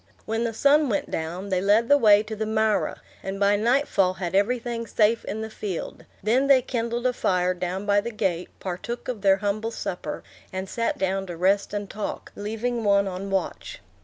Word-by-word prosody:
When 225 +2 -1
the 230 - -2
sun 285 +3 +4
went 200 - -1
down, 175 +5 -4
they 185 -1 +1
led 210 +4 +3
the 285 - +6
way 210 -6 +6
to 220 0 -6
the 215 0 -3
marah, 220 -1 +1 0.2
and 195 +1 -5
by 200 0 +4
nightfall 215 -5 +2
had 180 -1 -4
everything 230 +3 0
safe 220 +2 +2
in 220 - -4
the 220 - -4
field; 200 -5 -5 0.2
then 250 +6 +3
they 265 -2 +6
kindled 235 -1 -2
a 250 - +3
fire 180 -5 +1
down 185 +2 -3
by 205 0 +3
the 235 - -4
gate, 190 -6 -2
partook 190 +6 -5
of 240 -5 -4
their 195 -1 +5
humble 205 +3 -1
supper, - - -5 0.3
and 190 0 -4
sat 230 +4 -1
down 190 0 -1
to 175 -2 -6
rest 195 +3 +2
and 205 -1 -3
talk, 210 +1 -5
leaving 225 +3 -3
one 200 -1 +3
on 190 +1 -5
watch. 195 -1 -3
205 Hz, 195 wpm, -25 LUFS, 195-230 Hz, 0.3 s, the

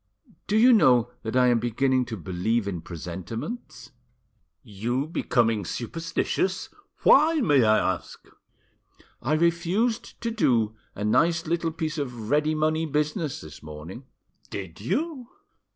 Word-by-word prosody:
Do 210 - +2
you 245 +3 +7
know 125 - +4
that 110 +2 -4
I 125 -1 +5
am 120 -1 +3
beginning 130 +2 +1
to 115 -2 -6
believe 95 +6 -1
in 90 -4 -3
presentiments?" 95 - -7 0.7
"You 120 +5 -2
becoming 115 -9 +1
superstitious! 165 - -2 0.3
Why, 310 +4 +6
may 145 - +4
I 110 -3 +3
ask?" - - -15 1.0
"I 135 +6 0
refused 170 +8 0
to 230 -1 -2
do 115 - +1 0.2
a 100 - -5
nice 165 +10 +2
little 165 0 -1
piece 160 -1 -3
of 120 -5 -5
ready 150 +1 +2
money 155 +1 +1
business 150 +1 -1
this 75 -1 -11
morning." 75 - -9 0.4
"Did 95 -3 -7
you?" 265 - -2
130 Hz, 130 wpm, -26 LUFS, 110-170 Hz, 1.0 s, you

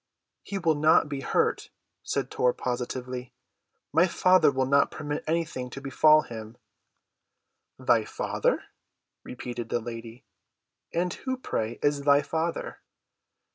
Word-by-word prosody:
"He 200 - -5
will 165 -4 +2
not 155 0 +4
be 140 -2 -4
hurt," - - 0 0.3
said - - -2
Tor 125 -1 +2
positively. 125 0 -4 0.6
"My 170 +3 +5
Father 185 0 +4
will 130 -1 0
not 140 +2 +3
permit 145 -1 -4
anything 160 -6 -2
to 135 - -7
befall 155 +3 +5
him." 110 0 -9 1.2
"Thy - - +2
Father?" - - -1 0.6
repeated 120 -2 -6
the - - 0
lady. 115 +2 -8 0.7
"And 175 +1 -1
who, 260 -1 -4
pray, 115 - -3
is 145 -1 +2
thy 140 0 +4
Father?" 165 +3 -3
140 Hz, 125 wpm, -27 LUFS, 125-160 Hz, 1.2 s, My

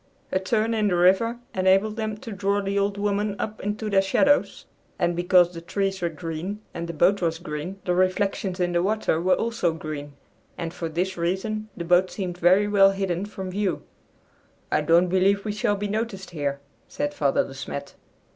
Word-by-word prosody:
A 185 - +2
turn 220 +4 0
in 215 -2 +1
the 180 - +1
river 190 +7 +3 0.2
enabled 190 +3 +3
them 215 -1 -3
to 225 - -9
draw 200 0 0
the 200 0 -1
"Old 200 0 0
Woman" 205 0 0
up 215 0 -4
into 210 +2 -3
their 195 -2 +4
shadows, 285 +9 +2 0.3
and 175 0 +1
because 175 0 +4
the 165 - -7
trees 195 +2 -2
were 170 - +1
green 165 +5 -5
and 170 0 -4
the - - -3
boat 180 +5 +3
was 165 -2 0
green, 170 +3 -6
the 180 - +1
reflections 185 +1 0
in 175 -1 +1
the 175 0 +2
water 200 -4 0
were 185 +1 +3
also 225 -8 0
green, 150 -3 -6 0.4
and 165 -1 -4
for 165 - -4
this 180 +4 -2
reason 205 +5 -2
the 170 - -4
boat 180 +2 +4
seemed 180 -3 -5
very 185 +4 +4
well 200 -1 +6
hidden 195 -1 -2
from 190 -2 -6
view. 200 -1 -1 0.9
"I - - +3
don't 165 +4 +4
believe 195 +3 +2
we 210 - -1
shall 205 0 0
be 205 +1 -3
noticed 210 -3 -3
here," 145 -4 -2 0.3
said 290 0 -3
Father 140 - +2
De 135 - -9
Smet. 140 +1 -6
190 Hz, 195 wpm, -25 LUFS, 175-205 Hz, 0.9 s, well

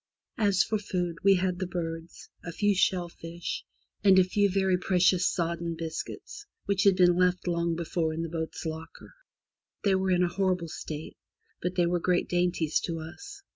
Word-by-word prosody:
As 200 -3 +4
for 215 - -1
food, 180 -4 -2
we 195 0 +6
had 180 -1 0
the 185 - -2
birds, 165 -1 -5 0.2
a 170 - -5
few 205 +4 +2
shellfish, 175 -2 -2 0.4
and 195 -2 +6
a 185 - +8
few 200 +2 +2
very 190 -1 +2
precious 180 0 +3
sodden 170 -1 -2
biscuits, 165 - -6 0.2
which 200 -1 +1
had 195 -2 +6
been 180 -1 +5
left 180 0 +1
long 170 -1 0
before 165 -1 -1
in 160 +1 -3
the - - -3
boat's 160 0 -4
locker. 160 0 -7 0.7
They 200 - +3
were 190 0 +1
in 180 -1 +3
a - - +3
horrible 185 -3 0
state, 155 0 -7 0.4
but 180 +1 -2
they 175 - +3
were 175 +1 +1
great 175 +1 +1
dainties 175 -3 +1
to 165 -2 -3
us. 400 - -10
180 Hz, 175 wpm, -28 LUFS, 170-190 Hz, 0.7 s, a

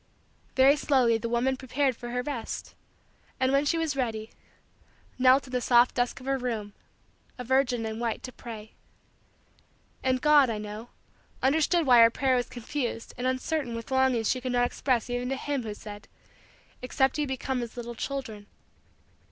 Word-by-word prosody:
Very 270 +2 +6
slowly 255 -6 +2
the 230 - -4
woman 245 +3 +1
prepared 260 0 -1
for 240 +1 -8
her 250 +1 -2
rest 270 -6 -5 0.7
and, 260 0 +2
when 275 +1 +3
she 330 +3 +1
was 320 -3 -1
ready, 225 -4 -3 0.9
knelt 260 +2 +5
in 255 - -12
the 250 -1 -1
soft 240 +1 +4
dusk 245 +1 -1
of 255 - -12
her 270 0 0
room, 220 -5 -3 0.6
a 250 - -5
virgin 250 -2 +1
in 220 0 -4
white 235 -2 -2
to 255 - -6
pray. 220 -3 -9 1.3
And 260 -1 +1
God, 295 -2 +5
I 220 - -2
know, 210 +3 -7 0.5
understood 315 +5 +3
why 245 -3 +7
her 230 - +8
prayer 260 +2 +1
was 245 -1 -1
confused 240 -1 -4
and 250 - -2
uncertain 260 -1 -1
with 230 +3 -7
longings 260 -4 +2
she 255 - 0
could 255 0 -3
not 245 0 +3
express 245 -2 0
even 245 0 -2
to 270 - -1
him 280 0 -2
who 220 -3 -5
said: 205 -1 -10 0.7
"Except 265 +3 +1
ye 295 - 0
become 265 -1 -2
as 235 0 -7
little 240 0 -5
children." 230 -5 -5
250 Hz, 175 wpm, -27 LUFS, 235-265 Hz, 1.3 s, her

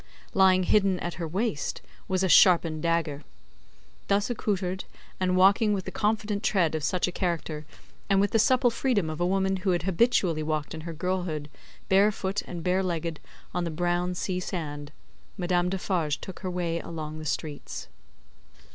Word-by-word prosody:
Lying 190 -1 +5
hidden 195 -1 +3
at 175 0 -3
her 165 - -2
waist, 185 - -2 0.2
was 190 0 0
a - - +3
sharpened 170 -4 +5
dagger. 165 -3 0 0.9
Thus 200 +4 +1
accoutred, 190 -5 -2 0.3
and 185 -1 +1
walking 200 +3 +5
with 190 -2 -2
the - - -5
confident 210 -1 0
tread 180 -8 +2
of 155 -2 -2
such 180 +4 +1
a - - -2
character, 165 -4 -3 0.4
and 195 -1 +4
with 200 +1 +2
the 225 - +3
supple 250 +1 +4
freedom 220 -9 0
of 155 - -5
a 175 - +2
woman 190 0 +1
who 190 +1 -2
had 175 -2 +1
habitually 190 -4 +2
walked 155 -1 -2
in 160 - -6
her - - -5
girlhood, 170 -3 -3 0.4
bare 200 +2 +5
foot 195 0 -2
and 170 -2 -6
bare 185 +2 +2
legged, 170 -3 -2 0.3
on 180 +1 -1
the 170 - -2
brown 175 +2 -1
sea 180 +1 -2
sand, 150 -5 -5 0.5
Madame 180 -1 +1
Defarge 180 -5 -1
took 190 - -8
her 185 - -4
way 175 -2 -1
along 155 -2 -6
the - - -7
streets. 150 -1 -4
180 Hz, 175 wpm, -27 LUFS, 165-195 Hz, 0.9 s, Lying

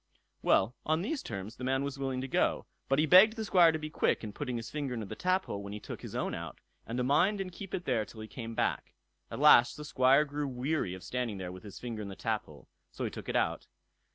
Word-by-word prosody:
Well, 105 +6 +3
on 155 +2 +1
these 280 +7 -2
terms 100 +4 -6
the 125 - -8
man 135 +1 +1
was 140 0 -4
willing 135 -2 -2
to 135 - -4
go; - - +1 0.2
but 135 - +3
he 155 - +4
begged 190 +7 +7
the 220 -2 -3
Squire 175 -4 +6
to 160 - -2
be 155 0 -6
quick - - +1
in 105 -2 -6
putting 130 -2 -3
his 115 0 -6
finger 140 -4 -3
into 110 -2 -4
the - - -7
taphole 185 - 0
when 100 0 -7
he 105 - -5
took - - -8
his - - -8
own - - -1
out, - - -6 0.3
and 115 - -4
to 125 - +1
mind 165 +10 +3
and 190 -1 -4
keep 195 +2 -6
it 180 - -5
there 120 -6 +1
till 110 +1 -11
he 110 - -7
came 115 -1 -7
back. - - -1 0.3
At - - -6
last 120 - +6
the 150 - -7
Squire 135 +1 +4
grew 145 0 -3
weary 130 - -2
of 95 - -11
standing 125 -5 -3
there 90 -1 -5
with 90 0 -10
his 100 -2 -10
finger 115 -3 -5
in 105 - -5
the 100 - -7
taphole, 90 - -4 0.2
so - - -5
he - - -3
took - - -8
it - - -2
out. - - 0
130 Hz, 265 wpm, -31 LUFS, 110-155 Hz, 0.3 s, begged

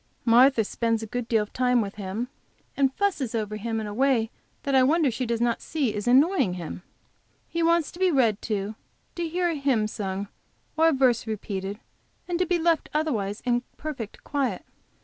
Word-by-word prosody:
Martha 240 0 +6
spends 230 +1 -1
a - - -3
good 245 +2 -4
deal 225 -3 +2
of 210 - -12
time 250 -1 +3
with 205 -3 -2
him, 210 +4 -4 0.5
and 270 -1 +3
fusses 300 - 0
over 215 -1 -2
him 225 +1 -2
in 220 - -4
a 205 - -5
way 245 -2 +2 0.3
that 280 - -1
I 265 - +6
wonder 295 +1 +3
she 250 +2 -3
does 235 0 0
not 235 -1 +1
see 280 -9 -1
is 210 +2 -4
annoying 270 - +4
to - - -6
him. 175 +1 -6 0.7
He 335 - -2
wants 335 -2 +3
to 345 - -13
be 375 -1 +4
read 235 - +2
to, 210 -1 -2 0.4
to 340 -2 -3
hear 350 +1 0
a - - 0
hymn 275 -7 +1
sung 200 -1 -4 0.5
or 320 +1 +4
a - - +5
verse 255 -5 +2
repeated, 200 -2 -4 0.5
and 350 -1 -1
to 365 - +1
be 355 - +2
left 330 -1 +1
otherwise 220 -10 -1
in 245 -1 +2 0.2
perfect 260 -9 -6
quiet. 265 -9 -2
245 Hz, 200 wpm, -26 LUFS, 215-300 Hz, 0.7 s, Martha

